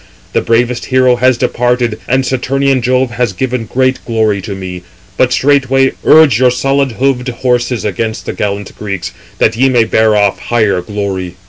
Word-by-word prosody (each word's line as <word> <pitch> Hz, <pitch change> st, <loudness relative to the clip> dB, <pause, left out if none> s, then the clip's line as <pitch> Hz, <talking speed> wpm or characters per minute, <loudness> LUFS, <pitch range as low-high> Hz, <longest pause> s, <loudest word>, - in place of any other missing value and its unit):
The -, -, +1 dB
bravest 120 Hz, +1 st, 0 dB
hero 130 Hz, -1 st, +2 dB
has 130 Hz, 0 st, +2 dB
departed, 120 Hz, -2 st, 0 dB
and 130 Hz, +1 st, +1 dB
Saturnian 135 Hz, +1 st, 0 dB
Jove 130 Hz, 0 st, +1 dB
has 120 Hz, -4 st, -1 dB
given 125 Hz, +3 st, -3 dB
great 130 Hz, +3 st, 0 dB
glory 110 Hz, -4 st, 0 dB
to 100 Hz, 0 st, -6 dB
me. 90 Hz, -2 st, -7 dB, 0.3 s
But 125 Hz, +3 st, +2 dB
straightway 135 Hz, -1 st, +2 dB
urge 150 Hz, -8 st, +5 dB
your 130 Hz, -1 st, +4 dB
solid 135 Hz, +1 st, 0 dB
hoofed 130 Hz, 0 st, -1 dB
horses 125 Hz, -1 st, -1 dB
against 110 Hz, +2 st, -3 dB
the -, -, -4 dB
gallant 100 Hz, -1 st, -4 dB
Greeks, 100 Hz, -3 st, -5 dB, 0.3 s
that -, -, +1 dB
ye 135 Hz, +3 st, +2 dB
may 120 Hz, -3 st, +3 dB
bear 110 Hz, -1 st, +2 dB
off 100 Hz, -1 st, +1 dB
higher 110 Hz, -6 st, 0 dB
glory." 95 Hz, -2 st, -4 dB
120 Hz, 165 wpm, -12 LUFS, 105-130 Hz, 0.3 s, urge